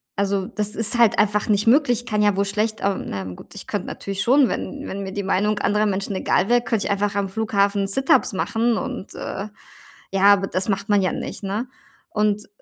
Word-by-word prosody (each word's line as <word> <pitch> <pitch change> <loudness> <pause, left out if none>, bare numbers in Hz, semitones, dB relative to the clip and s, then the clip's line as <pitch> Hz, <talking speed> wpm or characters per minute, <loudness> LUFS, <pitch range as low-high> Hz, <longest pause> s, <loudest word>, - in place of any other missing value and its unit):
also, 200 -1 0
das 210 +1 -3
ist 225 +2 0
halt 235 -3 +4
einfach 210 0 +2
nicht 210 +1 +2
möglich, 245 -1 +3
kann 210 -3 0
ja 205 -1 +3
wohl 200 +1 +1
schlecht 215 +2 -1
ah, 200 -1 +1
na 95 -1 -5
gut, 90 -1 -10
ich - - -8
könnte - - -3
natürlich 195 -1 -4
schon, 270 +2 +4
wenn 280 0 -4
wenn 200 +1 -5
mir 190 -1 -5
die 200 0 -3
Meinung 205 +2 +1
anderer 210 +1 +1
Menschen 195 0 -2
egal 195 +2 +1
wäre, 240 0 +4
könnte 225 -4 -1
ich - - -1
einfach 200 0 0
am 200 -1 -1
Flughafen 200 -1 0
Sit-ups 265 +1 +2
machen 225 +4 0
und, 185 - -5
äh, 195 +2 -5 0.6
ja, 195 0 -1
aber 195 -1 +1
das 185 +3 -2
macht 200 +1 -1
man 205 -1 +4
ja 185 - 0
nicht, - - -6
ne? 210 +6 -2 0.4
Und, 210 0 0
205 Hz, 215 wpm, -22 LUFS, 195-220 Hz, 0.6 s, halt